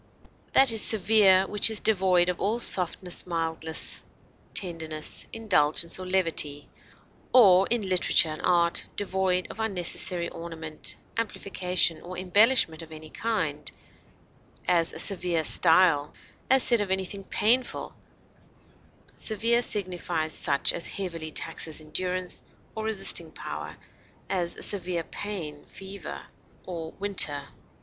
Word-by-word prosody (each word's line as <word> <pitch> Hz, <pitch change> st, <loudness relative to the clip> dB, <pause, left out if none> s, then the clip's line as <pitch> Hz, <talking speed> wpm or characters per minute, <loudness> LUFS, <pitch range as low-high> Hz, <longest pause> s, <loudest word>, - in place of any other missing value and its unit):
That 270 Hz, -2 st, +7 dB
is 225 Hz, -1 st, +4 dB
severe 205 Hz, -3 st, +5 dB
which 210 Hz, +2 st, +3 dB
is 220 Hz, -2 st, +2 dB
devoid 185 Hz, -4 st, +2 dB
of 180 Hz, -, -4 dB
all 215 Hz, +4 st, -1 dB
softness, 180 Hz, -4 st, -1 dB
mildness, 160 Hz, -1 st, -4 dB, 0.5 s
tenderness, 160 Hz, -4 st, -2 dB
indulgence 170 Hz, -6 st, 0 dB
or 185 Hz, -, -8 dB
levity, 165 Hz, -6 st, +1 dB, 0.6 s
or 195 Hz, -6 st, +5 dB
(in 225 Hz, -4 st, 0 dB
literature 180 Hz, -3 st, +3 dB
and 155 Hz, -, -7 dB
art) 170 Hz, -1 st, +2 dB
devoid 190 Hz, -2 st, -1 dB
of -, -, -13 dB
unnecessary 180 Hz, -4 st, -1 dB
ornament, 160 Hz, -2 st, -5 dB, 0.2 s
amplification, 185 Hz, -6 st, 0 dB
or 180 Hz, +1 st, -9 dB
embellishment 185 Hz, -2 st, +3 dB
of 160 Hz, -1 st, -13 dB
any 155 Hz, 0 st, -11 dB
kind; 230 Hz, 0 st, -3 dB, 1.0 s
as, 170 Hz, -2 st, +2 dB
a -, -, -9 dB
severe 180 Hz, -4 st, 0 dB
style; 155 Hz, -3 st, +3 dB, 0.3 s
as 265 Hz, 0 st, +5 dB
said 235 Hz, -3 st, +4 dB
of 205 Hz, -, -4 dB
anything 190 Hz, +1 st, -3 dB
painful, 240 Hz, +6 st, +1 dB, 1.2 s
severe 230 Hz, +2 st, 0 dB
signifies 175 Hz, -7 st, -3 dB
such 140 Hz, -1 st, +2 dB
as -, -, -1 dB
heavily 165 Hz, -5 st, -5 dB
taxes 160 Hz, -1 st, 0 dB
endurance 180 Hz, +4 st, -1 dB, 0.3 s
or 220 Hz, 0 st, -6 dB
resisting 220 Hz, -3 st, +2 dB
power; -, -, -9 dB, 0.5 s
as, 175 Hz, -3 st, -1 dB
a -, -, -6 dB
severe 180 Hz, -4 st, -1 dB
pain, 165 Hz, -7 st, -7 dB
fever, 190 Hz, -, -9 dB, 0.4 s
or 165 Hz, -3 st, -7 dB
winter. 195 Hz, -8 st, +3 dB
180 Hz, 120 wpm, -25 LUFS, 165-205 Hz, 1.2 s, That